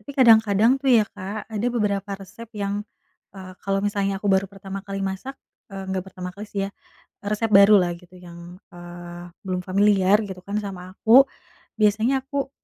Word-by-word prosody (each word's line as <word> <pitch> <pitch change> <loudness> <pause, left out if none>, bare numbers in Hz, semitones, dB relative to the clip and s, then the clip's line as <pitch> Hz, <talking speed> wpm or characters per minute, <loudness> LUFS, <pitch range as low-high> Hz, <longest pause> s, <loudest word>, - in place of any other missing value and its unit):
tapi 210 - -11
kadang-kadang 220 -3 +5
tuh 275 - -1
ya 225 -3 +6
Kak, 205 +2 -6
ada 215 +2 -1
beberapa 205 -3 -1
resep 210 +4 -12
yang, 200 0 -2 0.6
eee, 185 -1 -9
kalau 195 0 0
misalnya 200 -1 -1
aku 205 - -5
baru 190 +1 +2
pertama 195 0 -7
kali 195 0 -4
masak 195 +8 -6 0.3
eee, 195 -1 -7
nggak 190 -1 -2
pertama 180 0 -7
kali 210 +2 -8
sih 200 - -3
ya, - - -8 0.5
resep 210 +2 -1
baru 200 +1 +8
lah 175 -1 -1
gitu 180 0 -19
yang, 175 0 -12 0.2
eee, 175 0 -10 0.2
belum 185 -1 -2
familiar 200 +1 +3
gitu 190 -2 -8
kan, 200 +2 -5
sama 185 -2 -7
aku, 250 +5 +7 0.6
biasanya, 220 +6 +3
aku, 275 0 -3
200 Hz, 175 wpm, -23 LUFS, 185-210 Hz, 0.6 s, baru